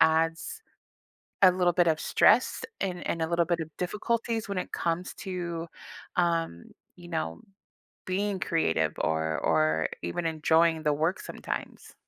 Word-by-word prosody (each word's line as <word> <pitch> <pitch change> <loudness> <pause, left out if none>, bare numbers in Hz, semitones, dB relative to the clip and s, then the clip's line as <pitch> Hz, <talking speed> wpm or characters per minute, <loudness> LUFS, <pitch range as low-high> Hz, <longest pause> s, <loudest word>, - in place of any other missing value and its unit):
adds 165 - +2 0.8
a 185 - +9
little 180 -1 +2
bit 175 -1 +4
of 160 -1 +2
stress - - +4 0.2
and 180 -2 -3
and 165 - -1
a 160 - +1
little 170 0 +2
bit 170 -1 0
of 160 - -4
difficulties 225 +4 -1
when 200 - -3
it 180 - -3
comes 170 +1 -1
to, 170 -3 -4 0.5
um, 165 - 0 0.3
you 175 -1 -12
know, 120 - -3 0.7
being 195 +1 -1
creative 80 - +1
or 80 0 0
or 80 0 +2
even 85 - -3
enjoying 160 0 +3
the 150 - +3
work 160 +5 0
sometimes? - - -6
170 Hz, 145 wpm, -28 LUFS, 155-180 Hz, 0.8 s, a